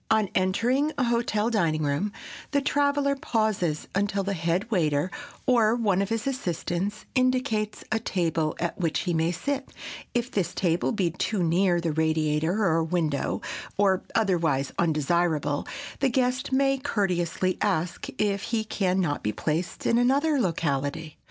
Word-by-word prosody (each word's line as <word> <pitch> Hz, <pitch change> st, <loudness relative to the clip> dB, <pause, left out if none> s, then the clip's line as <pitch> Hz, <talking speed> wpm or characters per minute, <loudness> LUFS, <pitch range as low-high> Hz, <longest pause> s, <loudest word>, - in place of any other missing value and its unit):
On 215 Hz, -3 st, +3 dB
entering 240 Hz, +11 st, +2 dB
a 270 Hz, -, +2 dB
hotel 235 Hz, -2 st, +1 dB
dining 165 Hz, -8 st, +1 dB
room, 145 Hz, +8 st, 0 dB, 0.4 s
the 285 Hz, -, +4 dB
traveler 285 Hz, 0 st, +1 dB
pauses 215 Hz, -, -1 dB
until 200 Hz, 0 st, 0 dB
the 200 Hz, +1 st, -1 dB
head 175 Hz, +6 st, -1 dB
waiter, 155 Hz, -3 st, +1 dB, 0.3 s
or 230 Hz, -3 st, +4 dB
one 205 Hz, -5 st, +1 dB
of 200 Hz, -, -1 dB
his 225 Hz, 0 st, -1 dB
assistants, 200 Hz, -, -2 dB
indicates 255 Hz, -5 st, 0 dB
a 220 Hz, -, +2 dB
table 165 Hz, -7 st, -1 dB
at 170 Hz, +2 st, -2 dB
which 165 Hz, -4 st, 0 dB
he 175 Hz, -, -1 dB
may 165 Hz, +1 st, +1 dB
sit. 275 Hz, +10 st, -3 dB, 0.4 s
If 240 Hz, +1 st, 0 dB
this 180 Hz, -4 st, -1 dB
table 175 Hz, -2 st, +1 dB
be 190 Hz, -7 st, 0 dB
too 185 Hz, +3 st, -1 dB
near 175 Hz, +1 st, +3 dB
the 170 Hz, -1 st, -1 dB
radiator 160 Hz, +4 st, +1 dB
or 165 Hz, -2 st, +3 dB
window, 160 Hz, -4 st, -1 dB, 0.3 s
or 195 Hz, -2 st, +3 dB
otherwise 165 Hz, -10 st, +1 dB
undesirable, 155 Hz, -2 st, +1 dB, 0.3 s
the 270 Hz, -, +3 dB
guest 255 Hz, +1 st, 0 dB
may 270 Hz, 0 st, +2 dB
courteously 185 Hz, -, 0 dB
ask 180 Hz, -4 st, -1 dB
if 200 Hz, -2 st, +1 dB
he 225 Hz, 0 st, -1 dB
can 190 Hz, -3 st, 0 dB
not 145 Hz, -5 st, -1 dB
be 105 Hz, -, -1 dB
placed 155 Hz, -, -3 dB
in 235 Hz, -, +3 dB
another 280 Hz, +4 st, +3 dB
locality. 155 Hz, -, -1 dB
190 Hz, 150 wpm, -26 LUFS, 165-230 Hz, 0.4 s, the